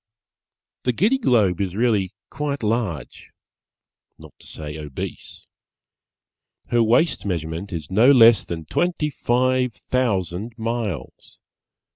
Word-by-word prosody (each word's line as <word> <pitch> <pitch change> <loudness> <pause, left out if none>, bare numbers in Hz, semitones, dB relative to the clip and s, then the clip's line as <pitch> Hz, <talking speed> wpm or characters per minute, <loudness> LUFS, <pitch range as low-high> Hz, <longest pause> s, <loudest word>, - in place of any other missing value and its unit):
The 125 - 0
Giddy 220 - +2
Globe 105 - +2
is 95 -2 -2
really 105 -5 +1 0.2
quite 145 -3 -3
large, 105 - -3 0.9
not - - -14
to - - -17
say 75 -1 -7
obese. 75 -3 -7 1.2
Her 120 -1 +3
waist 120 +9 +2
measurement 85 0 -4
is 80 -5 -6
no 115 +8 +6
less 115 -5 +7
than 80 -2 -6
twenty 155 - -1
five 125 -1 +1
thousand 110 -3 -2
miles. 115 - -4
110 Hz, 110 wpm, -22 LUFS, 90-125 Hz, 1.2 s, less